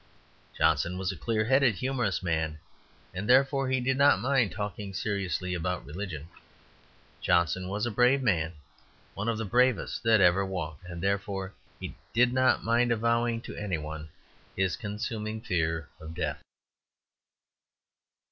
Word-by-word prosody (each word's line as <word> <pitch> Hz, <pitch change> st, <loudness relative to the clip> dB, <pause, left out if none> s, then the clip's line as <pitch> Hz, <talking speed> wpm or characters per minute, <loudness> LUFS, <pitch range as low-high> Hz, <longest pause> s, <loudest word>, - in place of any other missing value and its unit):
Johnson 80 Hz, +3 st, +2 dB
was 95 Hz, 0 st, -1 dB
a -, -, -7 dB
clear 110 Hz, +2 st, 0 dB
headed 130 Hz, -2 st, +4 dB
humorous 125 Hz, -6 st, -1 dB
man, 80 Hz, -2 st, -1 dB, 0.6 s
and 95 Hz, +4 st, -4 dB
therefore 135 Hz, +1 st, +4 dB
he 130 Hz, 0 st, +2 dB
did 130 Hz, +2 st, 0 dB
not 140 Hz, -6 st, +6 dB
mind 125 Hz, -3 st, +2 dB
talking 100 Hz, +1 st, -5 dB
seriously 95 Hz, -3 st, -2 dB
about 90 Hz, 0 st, -2 dB
religion. 80 Hz, -1 st, -6 dB, 0.9 s
Johnson 90 Hz, +1 st, +2 dB
was 105 Hz, +3 st, -1 dB
a 120 Hz, -, -1 dB
brave 125 Hz, +5 st, +3 dB
man, 85 Hz, -8 st, +1 dB, 0.6 s
one 105 Hz, +4 st, -2 dB
of 115 Hz, -, 0 dB
the 110 Hz, -, -3 dB
bravest 125 Hz, +5 st, +2 dB
that 115 Hz, -1 st, +4 dB
ever 95 Hz, +1 st, +5 dB
walked, 90 Hz, -5 st, -5 dB
and 85 Hz, -1 st, -7 dB
therefore 100 Hz, -1 st, -1 dB, 0.3 s
he -, -, -6 dB, 0.2 s
did 125 Hz, +1 st, +4 dB
not 130 Hz, -2 st, +3 dB
mind 120 Hz, +1 st, +2 dB
avowing 115 Hz, 0 st, +1 dB
to -, -, -8 dB
any 100 Hz, -5 st, -2 dB
one 80 Hz, 0 st, -7 dB, 0.5 s
his 95 Hz, -2 st, +1 dB
consuming 110 Hz, 0 st, -4 dB
fear 80 Hz, -7 st, -1 dB
of 80 Hz, +1 st, -9 dB
death. 90 Hz, -1 st, -2 dB
100 Hz, 145 wpm, -29 LUFS, 90-120 Hz, 0.9 s, not